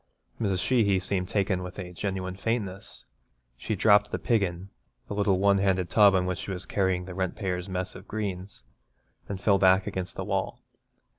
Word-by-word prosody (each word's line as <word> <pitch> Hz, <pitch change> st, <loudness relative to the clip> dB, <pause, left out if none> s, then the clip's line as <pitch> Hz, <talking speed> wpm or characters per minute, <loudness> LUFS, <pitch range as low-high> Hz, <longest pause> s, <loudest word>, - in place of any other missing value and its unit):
Mrs. 95 Hz, -4 st, 0 dB
Sheehy 110 Hz, -7 st, +3 dB
seemed 95 Hz, 0 st, -1 dB
taken 95 Hz, -2 st, 0 dB
with 90 Hz, 0 st, -8 dB
a 90 Hz, -2 st, -7 dB
genuine 95 Hz, 0 st, -3 dB
faintness. 100 Hz, -2 st, -4 dB, 0.5 s
She 105 Hz, -, -3 dB
dropped 105 Hz, +1 st, +4 dB
the -, -, -2 dB
'piggin,' 95 Hz, -5 st, -1 dB, 0.4 s
the -, -, -5 dB
little 100 Hz, -2 st, +2 dB
one 100 Hz, +1 st, +3 dB
handled 95 Hz, -2 st, +1 dB
tub 100 Hz, -2 st, +6 dB
in 90 Hz, -1 st, +2 dB
which 90 Hz, -2 st, -2 dB
she -, -, -6 dB
was 95 Hz, -1 st, -3 dB
carrying 95 Hz, -2 st, 0 dB
the 95 Hz, -, -8 dB
rentpayer's 95 Hz, 0 st, -3 dB
mess 95 Hz, 0 st, -3 dB
of 95 Hz, -, -12 dB
greens, 100 Hz, -5 st, -5 dB, 0.7 s
and 100 Hz, -2 st, -4 dB
fell 100 Hz, 0 st, +3 dB
back 95 Hz, 0 st, +5 dB
against 95 Hz, -1 st, -4 dB
the -, -, -4 dB
wall. -, -, -2 dB
95 Hz, 175 wpm, -27 LUFS, 90-100 Hz, 0.7 s, tub